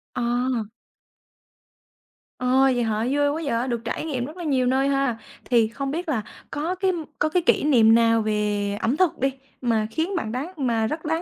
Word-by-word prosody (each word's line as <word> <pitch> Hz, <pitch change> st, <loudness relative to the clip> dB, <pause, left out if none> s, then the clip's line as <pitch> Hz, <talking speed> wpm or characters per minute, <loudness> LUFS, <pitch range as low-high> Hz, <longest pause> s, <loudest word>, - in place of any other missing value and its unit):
À! 240 Hz, -2 st, 0 dB, 1.7 s
Ờ, 250 Hz, -, -2 dB, 0.3 s
vậy 245 Hz, -, +1 dB
hả? 220 Hz, 0 st, 0 dB
Vui 290 Hz, 0 st, +2 dB
quá 310 Hz, +3 st, -2 dB, 0.2 s
vậy, 250 Hz, -, -2 dB
được 235 Hz, -2 st, -2 dB
trải 235 Hz, -, -3 dB
nghiệm 260 Hz, -6 st, -2 dB
rất 310 Hz, +6 st, -10 dB
là 350 Hz, -, -6 dB
nhiều 265 Hz, -5 st, +1 dB
nơi 265 Hz, +2 st, +2 dB
ha. 275 Hz, -4 st, +1 dB, 0.3 s
Thì 235 Hz, -3 st, +3 dB
không 275 Hz, +4 st, -4 dB
biết 335 Hz, +3 st, -3 dB
là 250 Hz, -8 st, 0 dB, 0.3 s
có 320 Hz, +5 st, -2 dB
cái 375 Hz, 0 st, +1 dB, 0.3 s
có 310 Hz, -, +2 dB
cái 355 Hz, +3 st, +1 dB
kỷ 325 Hz, -, +2 dB
niệm 230 Hz, -6 st, +5 dB
nào 230 Hz, -1 st, +4 dB
về 210 Hz, -1 st, 0 dB
ẩm 255 Hz, +7 st, +1 dB
thực 370 Hz, -4 st, +2 dB
đi 270 Hz, +1 st, +1 dB, 0.3 s
mà 225 Hz, -4 st, +1 dB
khiến 335 Hz, -, -1 dB
bạn 220 Hz, -10 st, -2 dB
đáng 285 Hz, +10 st, -4 dB
mà 230 Hz, -5 st, +1 dB
rất 315 Hz, +6 st, -5 dB
đáng 320 Hz, +2 st, 0 dB
255 Hz, 200 wpm, -24 LUFS, 230-305 Hz, 1.7 s, niệm